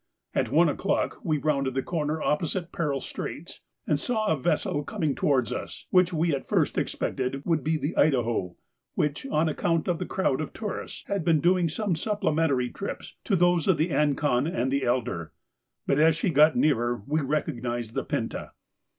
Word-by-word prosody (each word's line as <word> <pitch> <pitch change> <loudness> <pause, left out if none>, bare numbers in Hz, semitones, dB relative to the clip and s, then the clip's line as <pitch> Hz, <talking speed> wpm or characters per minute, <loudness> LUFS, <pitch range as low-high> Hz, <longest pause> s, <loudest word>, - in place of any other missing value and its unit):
At - - 0
one - - +5
o'clock - - -1
we 155 -6 +1
rounded 140 -3 0
the 135 - 0
corner 155 -2 -2
opposite 170 +3 -1
Peril 145 -5 -1
Straits, - - -6 0.2
and 145 - +1
saw 220 +5 -1
a 180 - +2
vessel 145 +1 0
coming 145 0 -1
towards 130 -4 +1
us, - - -6
which 180 0 +4
we 165 -1 +1
at 135 - -3
first - - +1
expected 135 +2 -2
would 160 -5 +1
be 160 +1 +1
the 150 +3 -3
'Idaho,' 120 - +1 0.4
which, 150 - -1
on 160 - +1
account 165 +1 0
of 175 -2 0
the 185 - -3
crowd 190 -8 0
of 155 - -5
tourists, 210 -3 -5
had 200 -4 -2
been 165 -2 +3
doing 175 +1 +3
some 195 +2 -1
supplementary 160 - 0
trips 200 - -6
to 200 - +2
those 175 -2 +3
of 190 -4 +4
the 160 +3 0
'Ancon' 145 -2 +2
and 130 -2 -1
'Elder,' 120 - -1 0.5
but 140 - +2
as 160 0 +5
she 170 +3 0
got 155 +1 +5
nearer 120 -6 +1
we 155 +2 0
recognised 120 -5 -2
the - - -1
'Pinta. - - -4
150 Hz, 175 wpm, -27 LUFS, 135-170 Hz, 0.5 s, one